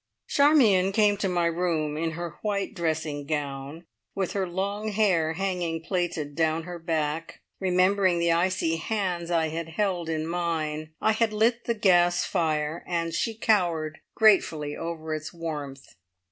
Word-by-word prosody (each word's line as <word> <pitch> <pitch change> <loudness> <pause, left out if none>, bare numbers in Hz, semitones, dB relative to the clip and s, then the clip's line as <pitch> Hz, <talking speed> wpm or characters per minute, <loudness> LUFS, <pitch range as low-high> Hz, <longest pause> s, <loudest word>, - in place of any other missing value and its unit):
Charmion 235 -11 +4
came 210 -1 +4
to 195 -1 -1
my 175 -1 +1
room 165 -3 0
in 165 +1 -2
her 170 0 -6
white 205 -1 -2
dressing 155 -5 -2
gown, 145 +1 -4 0.3
with 195 -2 -1
her 195 -2 -1
long 200 +4 -3
hair 190 -7 +2
hanging 175 -2 -2
plaited 170 -5 -2
down 160 +1 +1
her 175 0 -7
back. 160 -1 -2 0.2
Remembering 185 0 +3
the 170 0 +2
icy 170 -1 +1
hands 180 -2 -2
I 165 -2 +1
had 165 +1 -4
held 175 -1 -1
in 155 -1 -1
mine, 160 -3 -2
I 220 - +3
had 220 0 +1
lit 230 +3 +1
the 235 - 0
gas 175 -4 +3
fire, 155 -2 -1
and 165 -1 -1
she 225 -2 -1
cowered 170 -9 +1 0.2
gratefully 165 -9 +3
over 160 -1 -4
its 155 0 -5
warmth. 150 -5 -6
170 Hz, 150 wpm, -26 LUFS, 160-195 Hz, 0.3 s, Charmion